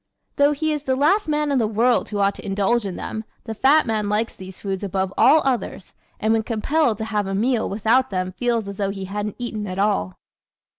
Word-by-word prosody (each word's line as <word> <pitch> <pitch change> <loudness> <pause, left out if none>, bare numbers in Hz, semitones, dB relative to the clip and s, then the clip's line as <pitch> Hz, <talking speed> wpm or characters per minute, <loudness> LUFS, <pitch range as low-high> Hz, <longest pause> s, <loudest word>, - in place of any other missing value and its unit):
Though 285 +1 +4
he 315 +2 -1
is 300 - -3
the 265 -2 0
last 320 +10 +2
man 300 -1 0
in 275 - +2
the 225 - +1
world 230 +3 +2
who 210 - -3
ought 200 0 +2
to - - -10
indulge 205 +3 0
in 185 - -5
them 220 - -5 0.2
the 225 - -5
fat 275 +7 +4
man 215 -3 -1
likes 215 +2 -1
these 190 0 -11
foods 195 -1 -4
above 190 -1 -2
all 275 +8 +5
others 245 -7 -2 0.3
and 220 +1 +2
when 225 - +2
compelled 235 +3 0
to 220 - -4
have 210 -2 -1
a 195 - -2
meal 235 +3 +1
without 225 +6 +2
them 185 -1 -2
feels 230 +2 -1
as 200 -1 -7
though 200 -1 -1
he 195 -1 -5
hadn't 205 +2 -4
eaten 220 -4 -4
at 185 0 -5
all. 195 - 0
220 Hz, 230 wpm, -22 LUFS, 200-255 Hz, 0.3 s, all